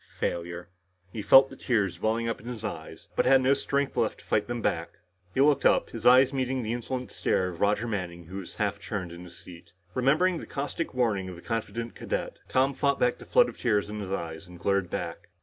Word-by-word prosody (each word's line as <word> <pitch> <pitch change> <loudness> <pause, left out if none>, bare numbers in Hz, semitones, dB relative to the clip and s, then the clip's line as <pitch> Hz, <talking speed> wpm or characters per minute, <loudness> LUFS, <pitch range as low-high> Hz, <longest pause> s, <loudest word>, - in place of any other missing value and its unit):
Failure. 85 0 -3 0.4
He 110 - -5
felt 135 +7 +7
the - - -9
tears 100 -7 0
welling 115 +1 +1
in 115 -1 -1
his 120 -3 -6
eyes, 80 -5 -7
but - - +2
had 135 - +7
no 135 +2 +5
strength 140 0 -1
left - - 0
to - - -18
fight 105 -1 +1
them 120 0 -3
back. 85 -6 -2 0.4
He 135 - +3
looked 145 0 +4
up, - - +3
his - - -1
eyes 130 +2 +7
meeting 130 -1 -1
the 110 +1 -2
insolent 125 +1 -4
stare 90 -1 0
of 85 -1 -9
Roger 105 +3 +2
Manning 90 -5 -4
who 95 +4 -8
was 95 -3 -8
half 100 -1 -1
turned 95 -6 -4
in 85 +1 -9
his 85 -1 -11
seat. 85 -1 -13 0.2
Remembering 155 +8 +2
the - - -9
caustic 145 +2 -4
warning 105 -7 +1
of 90 - -7
the 85 - -12
confident 115 0 -3
cadet, - - -4
Tom 135 +2 +2
fought 140 0 +1
back 245 - +2
the - - -12
flood - - +5 0.2
in 105 -2 +1
his 95 -2 -5
eyes 80 -2 -4
and 90 0 -12
glared 100 0 0
back. - - -5
110 Hz, 220 wpm, -28 LUFS, 90-130 Hz, 0.4 s, felt